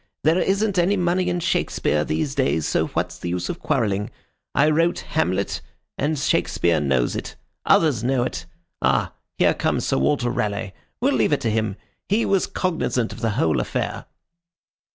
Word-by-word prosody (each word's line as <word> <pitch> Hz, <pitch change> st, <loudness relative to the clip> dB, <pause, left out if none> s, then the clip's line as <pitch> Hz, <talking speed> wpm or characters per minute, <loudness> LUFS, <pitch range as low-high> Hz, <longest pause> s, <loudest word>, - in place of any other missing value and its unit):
There 160 Hz, +4 st, +4 dB
isn't 195 Hz, 0 st, +1 dB
any 190 Hz, +4 st, +3 dB
money 180 Hz, 0 st, +1 dB
in 175 Hz, 0 st, 0 dB
Shakespeare 75 Hz, -, 0 dB
these 75 Hz, -3 st, -1 dB
days, 75 Hz, +3 st, +1 dB
so -, -, +1 dB
what's 90 Hz, +1 st, -3 dB
the 85 Hz, -, -4 dB
use 90 Hz, 0 st, -2 dB
of 170 Hz, -, -4 dB
quarrelling? 105 Hz, -8 st, 0 dB, 0.5 s
I 140 Hz, +3 st, +4 dB
wrote 165 Hz, +3 st, +2 dB
Hamlet, 100 Hz, -, 0 dB, 0.3 s
and 155 Hz, +1 st, -1 dB
Shakespeare 85 Hz, -9 st, +1 dB
knows 65 Hz, -4 st, +1 dB
it. -, -, -5 dB, 0.3 s
Others 140 Hz, -9 st, +4 dB
know 130 Hz, 0 st, +2 dB
it. 125 Hz, -, -4 dB, 0.3 s
Ah, -, -, +1 dB, 0.2 s
here -, -, +4 dB
comes -, -, -1 dB
Sir -, -, +1 dB
Walter 120 Hz, -, +1 dB
Raleigh. 105 Hz, -3 st, -2 dB, 0.3 s
We'll -, -, +3 dB
leave -, -, +2 dB
it -, -, +1 dB
to 115 Hz, -, 0 dB
him. 110 Hz, -2 st, 0 dB, 0.3 s
He 215 Hz, +4 st, +2 dB
was 195 Hz, -2 st, +2 dB
cognizant 145 Hz, -10 st, -1 dB
of 115 Hz, -, -10 dB
the 115 Hz, -1 st, 0 dB
whole 80 Hz, -5 st, +2 dB
affair." -, -, -3 dB
120 Hz, 170 wpm, -23 LUFS, -, 0.5 s, There